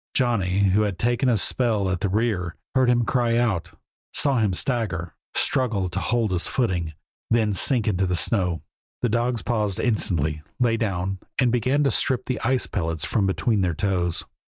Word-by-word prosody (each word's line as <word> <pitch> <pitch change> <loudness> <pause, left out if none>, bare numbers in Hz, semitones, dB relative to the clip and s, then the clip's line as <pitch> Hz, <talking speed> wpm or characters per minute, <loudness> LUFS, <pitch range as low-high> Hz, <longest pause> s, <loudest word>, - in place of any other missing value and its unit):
Johnny, 100 -6 +2
who 100 +3 +3
had 100 -4 -1
taken 120 +4 +1
a 115 - +3
spell 110 -1 +1
at 95 -1 -1
the 100 - -1
rear, 100 -5 -1 0.2
heard 130 -2 +3
him 120 -1 +3
cry 120 0 +1
out, 110 -8 0 0.4
saw 140 -4 +2
him 105 -3 +2
stagger, 95 -5 -2 0.2
struggle 110 -8 +1
to 95 - -3
hold 115 -1 0
his 90 -1 +2
footing, 90 -10 -1 0.4
then 110 -3 +2
sink 120 +3 +2
into 95 -2 +1
the 90 - 0
snow. 90 -3 0 0.4
The 120 - +2
dogs 120 0 0
paused 105 -5 -1
instantly, 80 - 0 0.2
lay 120 -2 +3
down, 95 -4 -2 0.2
and 125 -2 +3
began 130 +5 +1
to 140 - +2
strip 130 +2 0
the 130 - -3
ice 130 +1 +2
pellets 80 -4 -3
from 100 -4 +1
between 105 +2 +1
their 90 -3 0
toes. 90 -2 0
105 Hz, 180 wpm, -24 LUFS, 95-120 Hz, 0.4 s, who